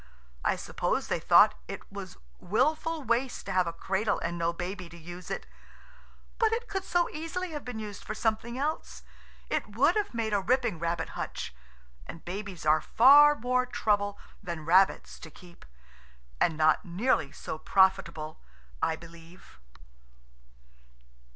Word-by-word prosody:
I - - +2
suppose - - -2
they - - 0
thought - - +6
it - - -8
was - - -8 0.2
wilful 310 - 0
waste 245 +1 -1
to - - -4
have 185 -1 +2
a - - -1
cradle 195 +5 -1
and 170 +1 -3
no 170 0 0
baby 180 +1 -6
to 170 - -12
use 175 +2 -10
it. - - -4 0.9
But 450 -1 +3
it 470 +1 -2
could 385 -1 -3
so 350 -2 +1
easily 330 +3 -4
have 295 -2 -5
been 245 -2 -6
used 210 -2 -7
for 215 - -5
something 225 +2 -1
else. 300 +4 -3 0.4
It 210 - -3
would 285 +9 +4
have 415 - -1
made 220 -2 -1
a 200 - +2
ripping 240 -4 +1
rabbit 170 0 -2
hutch, - - -5 0.5
and 165 - -10
babies 190 -2 -6
are 155 0 +4
far 290 - +7
more 250 0 0
trouble 205 -4 0 0.2
than 170 -3 -6
rabbits 185 +4 +3
to 160 - -10
keep, 175 +2 -16 0.7
and 160 - +2
not 155 0 +3
nearly 180 - 0
so 155 - -6
profitable, 170 -5 +1 0.4
I 160 - +1
believe. 170 +1 -15
205 Hz, 150 wpm, -29 LUFS, 170-255 Hz, 0.9 s, far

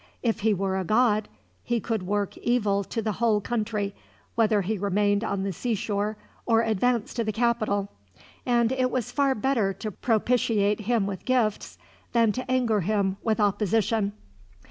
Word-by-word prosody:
If 225 -2 +1
he 220 0 +2
were 190 -1 0
a - - -1
god, 215 +1 +2 0.3
he 240 -1 0
could 225 -1 -2
work 205 0 -1
evil 210 -5 +1
to 225 +3 -3
the 215 - 0
whole 215 +1 +2
country, 210 -2 -2 0.4
whether 215 -3 +2
he 210 +2 -2
remained 205 +1 +1
on 200 -3 -2
the 195 -1 -2
seashore 210 0 -2 0.3
or 225 -1 +4
advanced 230 +1 0
to 230 - +1
the 215 - -1
capital; 215 -3 0 0.5
and 240 -1 +2
it 255 -1 +1
was 250 -3 -2
far 275 -2 +2
better 215 -4 +1
to 215 +3 -5
propitiate 220 -1 +1
him 220 -1 +1
with 195 -3 -5
gifts, 245 -5 0 0.4
than 230 -2 +4
to 255 +4 -4
anger 240 -5 +2
him 195 0 0
with 220 0 0
opposition. 210 0 +1
215 Hz, 165 wpm, -26 LUFS, 200-235 Hz, 0.5 s, or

